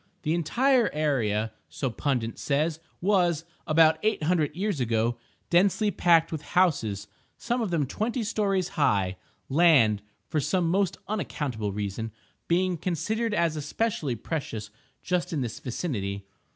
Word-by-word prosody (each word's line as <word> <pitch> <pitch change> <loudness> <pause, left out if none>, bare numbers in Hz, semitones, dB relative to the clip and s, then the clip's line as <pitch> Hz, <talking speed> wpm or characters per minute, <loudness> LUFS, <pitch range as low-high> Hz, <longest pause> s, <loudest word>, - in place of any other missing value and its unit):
The 155 -1 +1
entire 240 - +3
area 115 -8 0 0.2
(so 125 - -3
Pundit 120 -3 -2
says) 150 +3 0 0.2
was, 175 -4 +2 0.2
about 160 0 +5
eight 215 -6 0
hundred 155 -3 +1
years 195 -3 -1
ago, 115 0 0 0.3
densely 200 +4 +3
packed 165 -3 +4
with 160 -3 -3 0.2
houses, 110 - +2 0.3
some 240 +1 -1
of 220 - -1
them 165 -5 +1
twenty 225 - -2
stories 200 -4 0
high; 100 - +1 0.3
land 135 -10 +5 0.3
(for 155 - 0
some 175 +4 +1
most 190 +2 +1
unaccountable 140 - -2
reason) 105 +2 -4 0.4
being 180 +1 +2
considered 215 +7 -1
as 170 -3 +1
especially 150 - -1
precious 115 -6 -4 0.3
just 180 -1 -1
in 150 - 0
this 120 -3 -4
vicinity. 100 - -3
155 Hz, 135 wpm, -27 LUFS, 120-185 Hz, 0.4 s, about